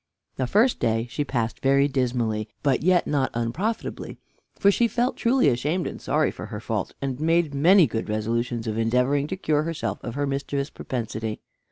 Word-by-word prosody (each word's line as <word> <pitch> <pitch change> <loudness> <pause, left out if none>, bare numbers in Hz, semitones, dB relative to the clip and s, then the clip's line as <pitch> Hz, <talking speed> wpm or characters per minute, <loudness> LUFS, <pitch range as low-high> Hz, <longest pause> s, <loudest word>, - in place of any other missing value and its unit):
The 130 - 0
first 225 - +3
day 115 0 +1
she 145 - -1
passed 120 -5 -2
very 140 +1 +4
dismally, 120 -5 -1
but 140 -3 +2
yet 180 +1 +3
not 135 -4 +1
unprofitably, 170 - -3 0.4
for 200 - +5
she 235 +4 +2
felt 240 +3 0
truly 250 - +2
ashamed 145 +8 0
and - - -6
sorry - - +1
for - - -8
her - - -6
fault, - - -3
and 135 -1 -2
made 165 -1 +2
many 170 +6 +6
good 115 -5 -3
resolutions 115 +2 -1
of 110 0 -2
endeavoring 125 +5 +2
to 190 - -4
cure 155 -5 +1
herself 165 0 -3
of 120 -1 -5
her 145 0 0
mischievous 140 +1 -2
propensity. 110 -3 -4
140 Hz, 180 wpm, -25 LUFS, 120-165 Hz, 0.4 s, many